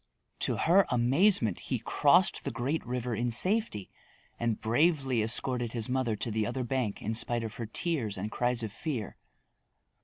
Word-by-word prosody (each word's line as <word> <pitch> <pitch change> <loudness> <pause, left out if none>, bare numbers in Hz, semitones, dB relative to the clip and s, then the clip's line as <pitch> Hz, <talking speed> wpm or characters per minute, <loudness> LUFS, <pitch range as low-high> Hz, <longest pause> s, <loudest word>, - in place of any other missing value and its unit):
To - - 0
her 190 +4 +4
amazement 125 - +3
he - - +1
crossed - - +3
the - - -2
great 140 +7 -2
river 125 -1 -2
in 120 +2 -1
safety 180 - 0 0.5
and 115 -2 -1
bravely 135 0 +2
escorted 120 +1 0
his 115 -1 -1
mother 125 -3 0
to 115 +2 -3
the 110 0 0
other 125 +2 -3
bank 125 -4 -2
in 110 - -2
spite 120 +1 -1
of 110 -1 -5
her 115 - -4
tears 115 - -1
and 105 +3 -4
cries 120 0 0
of 110 - -4
fear. 125 - -4
120 Hz, 165 wpm, -29 LUFS, 110-135 Hz, 0.5 s, her